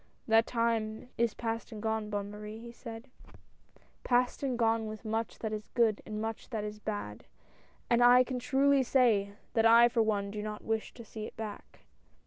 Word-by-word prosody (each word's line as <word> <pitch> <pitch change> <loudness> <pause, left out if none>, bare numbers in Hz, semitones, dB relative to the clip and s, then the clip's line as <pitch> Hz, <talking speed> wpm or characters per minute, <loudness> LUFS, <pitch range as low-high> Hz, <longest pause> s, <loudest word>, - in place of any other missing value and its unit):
" - - -40
That 225 0 +4
time 230 0 -1
is 235 -2 +1
past 230 -1 -4
and 215 - -7
gone, 220 0 -2
Bonne 205 -1 -3
Marie," 210 +1 -8
he 235 +1 -9
said, 235 +1 -10 0.5
" - - -32
past 245 0 +1
and 260 -3 -1
gone 225 -1 +1
with 215 +1 -8
much 220 -2 -2
that 220 -1 -4
is 210 -1 -5
good 225 -4 +3
and 215 0 -4
much 225 0 -5
that 220 -4 -3
is 210 0 -6
bad; 205 - -5 0.6
and 240 0 +4
I 245 +1 +8
can 255 -1 -4
truly 275 +2 +3
say, 230 -6 +2 0.2
that 225 -1 +4
I 235 +1 +7
for 235 -1 +1
one, 205 -2 0
do 210 0 -4
not 210 0 -6
wish 220 -1 -2
to 235 - -10
see 215 0 -7
it - - -14
back 215 -2 -8
225 Hz, 200 wpm, -31 LUFS, 215-235 Hz, 0.6 s, I